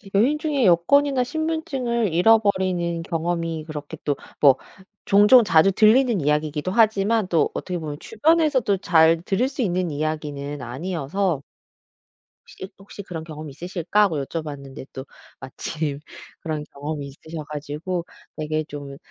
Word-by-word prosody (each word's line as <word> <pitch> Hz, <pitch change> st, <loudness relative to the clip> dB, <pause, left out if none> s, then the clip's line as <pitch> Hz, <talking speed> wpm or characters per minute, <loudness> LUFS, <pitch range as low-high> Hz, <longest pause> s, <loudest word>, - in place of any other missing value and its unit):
여행 255 Hz, +9 st, +3 dB
중에 295 Hz, -5 st, 0 dB
여권이나 260 Hz, +10 st, +4 dB
신분증을 270 Hz, -, -2 dB
잃어버리는 185 Hz, -4 st, +2 dB
경험이 165 Hz, -1 st, -2 dB
그렇게 155 Hz, 0 st, -7 dB
또 145 Hz, -, 0 dB, 0.2 s
뭐 135 Hz, -3 st, +6 dB, 0.5 s
종종 210 Hz, +5 st, +7 dB
자주 195 Hz, -1 st, +4 dB
들리는 220 Hz, -, +4 dB
이야기이기도 150 Hz, +3 st, 0 dB
하지만 220 Hz, -1 st, +2 dB
또 165 Hz, -4 st, +2 dB
어떻게 180 Hz, -1 st, -4 dB
보면 150 Hz, -3 st, -5 dB
주변에서도 280 Hz, -4 st, +2 dB
잘 165 Hz, -2 st, +4 dB
들을 200 Hz, +8 st, 0 dB
수 270 Hz, -2 st, -5 dB
있는 180 Hz, -4 st, 0 dB
이야기는 145 Hz, -2 st, -4 dB
아니어서 160 Hz, +5 st, -2 dB, 1.1 s
'혹시 190 Hz, -, -9 dB
혹시 200 Hz, +1 st, -10 dB
그런 165 Hz, -4 st, -7 dB
경험이 155 Hz, -2 st, -8 dB
있으실까?' 175 Hz, +6 st, 0 dB
하고 160 Hz, -9 st, 0 dB
여쭤봤는데 140 Hz, -4 st, -7 dB
또 130 Hz, -, -7 dB, 0.3 s
마침 145 Hz, +2 st, -4 dB, 0.4 s
그런 155 Hz, -2 st, -3 dB
경험이 145 Hz, 0 st, -5 dB
있으셔 155 Hz, +3 st, -9 dB
가지고 150 Hz, +4 st, -4 dB, 0.3 s
되게 155 Hz, 0 st, -2 dB
좀 140 Hz, -2 st, -8 dB
170 Hz, 325 characters per minute, -23 LUFS, 150-210 Hz, 1.1 s, 종종